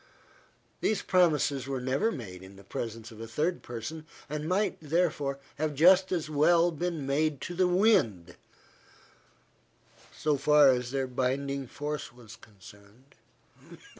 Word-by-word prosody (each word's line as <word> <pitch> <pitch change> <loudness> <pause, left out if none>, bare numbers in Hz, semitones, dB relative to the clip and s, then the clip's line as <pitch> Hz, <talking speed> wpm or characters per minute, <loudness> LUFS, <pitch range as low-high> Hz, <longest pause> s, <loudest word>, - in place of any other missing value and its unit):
These 215 - 0
promises 150 -7 +2
were 135 -1 -2
never 135 - 0
made 95 - -8
in 95 +1 -13
the 100 - -15
presence 115 +3 -6
of 110 0 -11
a 115 - -6
third 155 +10 -1
person, 145 +7 -7 0.2
and 150 +2 -4
might, 195 +1 0
therefore, 150 -3 0 0.2
have 155 -1 -1
just 185 +5 +5
as 170 -4 -1
well 165 +3 +3
been 165 -2 -3
made 145 +1 0
to 175 - -5
the 185 +1 +2
wind, 120 - +2 1.8
so 150 -2 0
far 150 0 +5
as 125 -1 +1
their 135 0 -1
binding 135 +2 -2
force 150 +3 -5
was 120 -3 -14
concerned. 105 +5 -18
140 Hz, 135 wpm, -29 LUFS, 125-165 Hz, 1.8 s, just